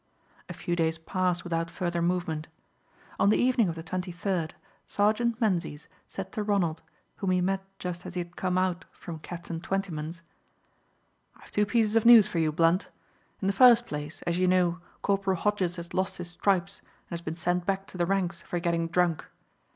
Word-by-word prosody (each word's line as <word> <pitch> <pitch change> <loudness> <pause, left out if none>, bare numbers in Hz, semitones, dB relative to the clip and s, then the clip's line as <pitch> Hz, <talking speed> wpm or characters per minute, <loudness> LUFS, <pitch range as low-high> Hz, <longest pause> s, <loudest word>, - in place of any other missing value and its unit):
A - - -4
few 175 - -2
days 160 -1 +1
passed 180 +1 -1
without 165 -1 -2
further 175 -2 -2
movement. 170 -3 -1 0.7
On 200 - +5
the 215 - +4
evening 245 -5 +3
of 165 - -4
the 165 - -7
23rd, 180 -1 -2 0.3
Sergeant 220 +3 +1
Menzies 175 - -1 0.2
said 190 0 -6
to 215 - -3
Ronald, 190 -6 0 0.4
whom 195 - -2
he 185 0 +3
met 190 +2 0 0.2
just 180 -2 -5
as 185 - -8
he - - -1
had 175 0 -9
come 185 -1 -1
out 185 -2 0
from 165 -2 -8
Captain 170 0 -6
Twentyman's, 170 -4 -3 1.1
"I - - -21
have - - -16
two 210 0 +2
pieces 220 -1 +2
of 225 0 +4
news 235 -4 +10
for 180 -5 -2
you, 155 -1 +2
Blunt. 165 +4 +2 0.5
In - - +1
the 195 - +2
first 240 +2 +7
place, 150 -2 -6
as 170 +1 -1
you 185 - +3
know, 180 -1 +3 0.2
Corporal 195 -1 +1
Hodges 190 -2 0
has 170 0 -8
lost 190 +1 -1
his 175 -1 -4
stripes 195 +1 0
and - - -32
has - - -15
been 160 -1 -4
sent 175 +1 -1
back 195 0 0
to 185 - -10
the 175 - +2
ranks 185 -2 0
for 175 - -4
getting 170 -1 0
drunk. 170 -2 +1
180 Hz, 190 wpm, -28 LUFS, 170-195 Hz, 1.1 s, news